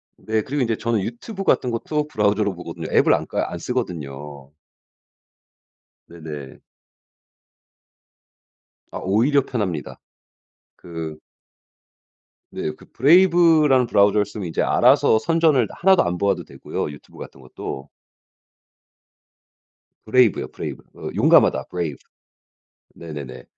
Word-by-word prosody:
네. 110 Hz, 0 st, -2 dB
그리고 140 Hz, +6 st, -3 dB
인제 115 Hz, -3 st, 0 dB
저는 115 Hz, -3 st, -1 dB
유튜브 190 Hz, -, -6 dB
같은 125 Hz, -, +2 dB
것도 150 Hz, +6 st, -2 dB
브라우저로 105 Hz, -5 st, 0 dB
보거든요. 85 Hz, -2 st, -7 dB
앱을 -, -, +4 dB
안 -, -, -1 dB
까 -, -, -1 dB
안 85 Hz, -, -5 dB
쓰거든요. 75 Hz, -, -5 dB, 1.6 s
네네. 75 Hz, -5 st, -9 dB, 2.3 s
아. -, -, -6 dB
오히려 120 Hz, +9 st, +2 dB
편합니다. 95 Hz, -, -4 dB, 0.8 s
그 80 Hz, -3 st, -7 dB, 1.3 s
네. 75 Hz, -, -3 dB
그 -, -, -17 dB
브레이브라는 160 Hz, -3 st, +5 dB
브라우저를 100 Hz, +1 st, +3 dB
쓰면 100 Hz, -4 st, -7 dB
이제 80 Hz, -, -2 dB
알아서 110 Hz, -, +4 dB
선전을 155 Hz, -2 st, +2 dB
하나도 190 Hz, +1 st, +3 dB
안 90 Hz, 0 st, -2 dB
보아도 100 Hz, +2 st, 0 dB
되고요 -, -, -5 dB
유튜브 75 Hz, -, -15 dB
같은 70 Hz, -, -11 dB
것도. 65 Hz, +1 st, -8 dB, 2.2 s
브레이브요, 125 Hz, +3 st, +2 dB
브레이브. -, -, -7 dB
어 -, -, -7 dB
용감하다. -, -, +4 dB
Brave. -, -, -3 dB, 1.0 s
네네네. 75 Hz, -6 st, -9 dB
105 Hz, 270 characters per minute, -22 LUFS, 80-130 Hz, 2.3 s, 브레이브라는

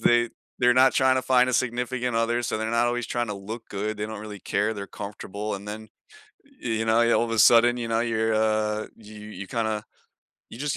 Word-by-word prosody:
they 120 Hz, -1 st, +3 dB, 0.3 s
they're 125 Hz, 0 st, +4 dB
not 130 Hz, +1 st, +5 dB
trying 130 Hz, 0 st, +3 dB
to 130 Hz, -, 0 dB
find 125 Hz, -1 st, +3 dB
a -, -, -1 dB
significant 125 Hz, 0 st, -1 dB
other, 120 Hz, +1 st, +1 dB
so 110 Hz, -, -2 dB
they're 110 Hz, 0 st, -2 dB
not 115 Hz, +1 st, +2 dB
always 120 Hz, 0 st, -1 dB
tryna 115 Hz, -5 st, -3 dB
look 110 Hz, +4 st, -8 dB
good, 105 Hz, +2 st, -3 dB
they 105 Hz, -, -3 dB
don't 110 Hz, -1 st, -6 dB
really 105 Hz, -2 st, -8 dB
care, 105 Hz, +5 st, -1 dB
they're 100 Hz, -1 st, -6 dB
comfortable, 105 Hz, 0 st, -6 dB
and 100 Hz, +1 st, -8 dB
then, 110 Hz, +1 st, -7 dB, 0.7 s
y 125 Hz, -, -4 dB
you 110 Hz, 0 st, 0 dB
know, 115 Hz, +1 st, +3 dB, 0.2 s
all -, -, +2 dB
of 115 Hz, -, -5 dB
a 115 Hz, -, 0 dB
sudden, 120 Hz, +2 st, +6 dB
you 120 Hz, -1 st, -3 dB
know, 115 Hz, 0 st, +1 dB
you're, 110 Hz, -1 st, 0 dB
uh 110 Hz, 0 st, 0 dB
you 110 Hz, -1 st, -13 dB
you 100 Hz, -1 st, -8 dB
kinda, 110 Hz, -2 st, -2 dB, 0.7 s
you -, -, -10 dB
just 145 Hz, +1 st, -2 dB
115 Hz, 225 wpm, -25 LUFS, 105-120 Hz, 0.7 s, sudden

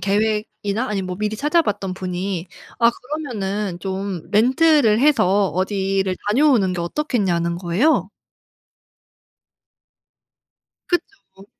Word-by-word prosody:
계획이나 215 Hz, +2 st, -1 dB
아니면 195 Hz, -3 st, -2 dB
뭐 180 Hz, -1 st, -5 dB
미리 215 Hz, +1 st, -2 dB
찾아봤던 220 Hz, -, 0 dB
분이 185 Hz, -1 st, -4 dB, 0.3 s
"아 235 Hz, 0 st, +6 dB
그러면은 210 Hz, -, -4 dB
좀 190 Hz, -2 st, -4 dB
렌트를 255 Hz, +1 st, +4 dB
해서 205 Hz, -9 st, +3 dB
어디를 190 Hz, +2 st, -1 dB
다녀오는 235 Hz, -6 st, +3 dB
게 175 Hz, -, -3 dB
어떻겠냐."는 175 Hz, -, -1 dB
거예요. 190 Hz, -, +1 dB, 2.8 s
그쵸. 350 Hz, -, -4 dB
205 Hz, 235 characters per minute, -21 LUFS, 190-245 Hz, 2.8 s, 아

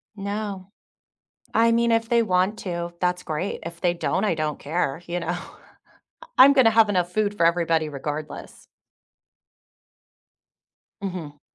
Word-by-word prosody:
No. 200 Hz, -1 st, -5 dB, 0.8 s
I 230 Hz, +1 st, +4 dB
mean, 235 Hz, 0 st, +2 dB
if 225 Hz, +1 st, +1 dB
they 235 Hz, -1 st, +4 dB
want 190 Hz, +1 st, +1 dB
to, 170 Hz, -2 st, -4 dB
that's 180 Hz, 0 st, 0 dB
great. 160 Hz, +5 st, -3 dB
If 170 Hz, 0 st, -8 dB
they 175 Hz, -1 st, +2 dB
don't, 190 Hz, +3 st, -1 dB
I 170 Hz, -, +1 dB
don't 155 Hz, -1 st, -2 dB
care, 155 Hz, 0 st, -2 dB
you 175 Hz, +1 st, -2 dB
know? 170 Hz, -, -6 dB
I 175 Hz, -, -8 dB, 1.0 s
I'm 275 Hz, +2 st, +9 dB
gonna 250 Hz, -5 st, +5 dB
have 220 Hz, -1 st, +5 dB
enough 180 Hz, -3 st, 0 dB
food 205 Hz, 0 st, 0 dB
for 170 Hz, -, +2 dB
everybody 165 Hz, -2 st, +2 dB
regardless. 150 Hz, +2 st, -7 dB, 2.3 s
Mhm. 165 Hz, -7 st, -6 dB
180 Hz, 140 wpm, -24 LUFS, 170-210 Hz, 2.3 s, I'm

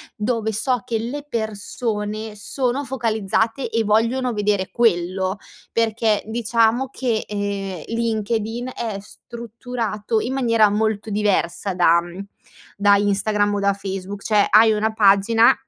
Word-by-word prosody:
dove 220 Hz, 0 st, -1 dB
so 245 Hz, +2 st, 0 dB
che 235 Hz, -3 st, -1 dB
le 245 Hz, +6 st, -4 dB
persone 215 Hz, -1 st, -4 dB
sono 250 Hz, +6 st, -2 dB
focalizzate, 225 Hz, -1 st, -1 dB
e 225 Hz, 0 st, 0 dB
vogliono 230 Hz, +4 st, +1 dB
vedere 205 Hz, -3 st, 0 dB
quello, 185 Hz, -3 st, +1 dB, 0.4 s
perché, 225 Hz, -1 st, +1 dB
diciamo 230 Hz, +2 st, +1 dB
che, 245 Hz, -4 st, -2 dB
ehm, 200 Hz, -4 st, -4 dB
LinkedIn 230 Hz, +1 st, -2 dB
è 225 Hz, -4 st, -4 dB
strutturato 230 Hz, -1 st, -4 dB
in 255 Hz, -, -3 dB
maniera 230 Hz, -5 st, +3 dB
molto 215 Hz, +1 st, -1 dB
diversa 200 Hz, -2 st, 0 dB
da 170 Hz, -1 st, +4 dB
mhmm, 175 Hz, +3 st, -8 dB, 0.5 s
da 200 Hz, 0 st, +5 dB
Instagram 205 Hz, +1 st, +1 dB
o -, -, -1 dB
da 200 Hz, 0 st, +2 dB
Facebook. 195 Hz, 0 st, -6 dB
Cioè, 210 Hz, -2 st, +3 dB
hai 220 Hz, +2 st, +6 dB
una 220 Hz, +1 st, 0 dB
pagina, 215 Hz, +2 st, +5 dB
215 Hz, 125 wpm, -21 LUFS, 205-230 Hz, 0.5 s, hai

